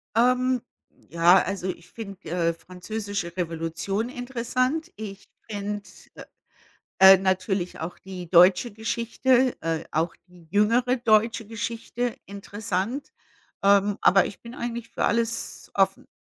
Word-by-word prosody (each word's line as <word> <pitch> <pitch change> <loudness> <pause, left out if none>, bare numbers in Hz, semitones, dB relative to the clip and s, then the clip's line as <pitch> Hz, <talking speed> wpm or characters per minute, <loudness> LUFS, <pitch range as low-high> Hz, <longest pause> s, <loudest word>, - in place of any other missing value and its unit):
Ähm, 250 +1 +3 0.5
ja, 170 +2 +5
also, 190 -1 -3
ich 175 -1 -6
finde, 200 -4 -9
äh, 170 -1 +1
französische 185 +1 -6
Revolution 170 +6 -2
interessant. 255 +6 -2
Ich 200 -2 -8 0.2
finde, 205 0 -4 0.3
äh, - - -8 0.8
äh, 190 0 +10
natürlich 190 -1 -1
auch 165 +2 -6
die 185 -3 -8
deutsche 180 +6 +6
Geschichte, 235 +4 +1
äh, 165 -1 -2
auch 165 +2 0
die 175 -2 -18
jüngere 235 +5 +3
deutsche 225 -2 +2
Geschichte 230 +2 -4
interessant, 205 - -4 0.5
ähm, 200 0 +4
aber 195 -1 +5
ich 200 - -9
bin 235 +1 -10
eigentlich 235 -3 -5
für - - -2
alles 230 0 -1
offen. - - +1
205 Hz, 120 wpm, -25 LUFS, 185-235 Hz, 0.8 s, äh